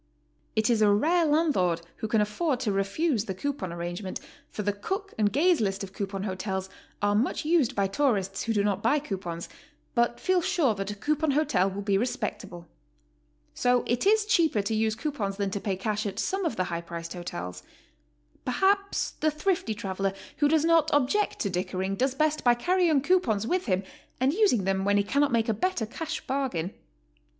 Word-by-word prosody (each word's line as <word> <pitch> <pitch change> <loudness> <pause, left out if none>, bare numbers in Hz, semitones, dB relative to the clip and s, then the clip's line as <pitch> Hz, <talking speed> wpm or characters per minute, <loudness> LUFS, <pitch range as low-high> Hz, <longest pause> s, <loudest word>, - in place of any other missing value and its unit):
It 220 -1 +2
is 225 -2 +2
a 210 - +6
rare 320 +11 +3
landlord 285 - +2 0.2
who 220 - -3
can 220 0 +2
afford 250 +6 0
to 225 -5 0
refuse 210 +5 0
the 190 - -4
coupon 240 -5 -3
arrangement, 175 +3 -5 0.3
for 210 - -5
the 205 0 0
Cook 385 - -4
and 210 -2 +2
Gaze 335 - +3
list 195 -1 -1
of 190 -1 -8
coupon 195 -1 -4
hotels 190 -1 -3 0.3
are 205 0 +3
much 240 +8 0
used 315 -6 +2
by 200 - +2
tourists 195 -4 0
who 230 - -1
do 205 -2 +2
not 200 -1 0
buy 235 +8 +3
coupons, 185 - -4 0.5
but 235 0 +1
feel 370 -1 +2
sure 310 -8 +2
that 195 -1 -4
a 205 - -4
coupon 305 +8 0
hotel 275 -10 +2
will 200 +1 -5
be 195 -1 +2
respectable. 200 -7 -4 0.9
So 245 0 +2
it 240 +10 0
is 430 0 +4
cheaper 325 - +2
to 200 - -2
use 220 0 +1
coupons 225 -8 -3
than 200 -1 -1
to 200 - -2
pay 195 -3 -1
cash 210 +2 -2
at 195 0 -5
some 385 - -1
of 310 - -1
the 185 - 0
high 170 -1 -3
priced 170 0 -7
hotels. 90 - -6 0.8
Perhaps 395 +9 +1
the 310 - +3
thrifty 325 - -1
traveler 195 -1 -2 0.2
who 290 - +3
does 315 +1 +3
not 330 -2 +4
object 290 +10 +1
to 200 - 0
dickering 185 +2 -2
does 260 +5 0
best 305 +1 +1
by 245 -1 +5
carrying 340 +1 +2
coupons 260 - +2
with 360 +6 -1
him 190 -1 +1 0.4
and 260 +3 +2
using 370 - +3
them 190 0 0
when 205 +1 +3
he 200 - +3
cannot 280 +7 +1
make 230 -1 +2
a 225 - +2
better 245 - -1
cash 310 +7 -5
bargain. 255 -11 -2
220 Hz, 195 wpm, -27 LUFS, 195-305 Hz, 0.9 s, a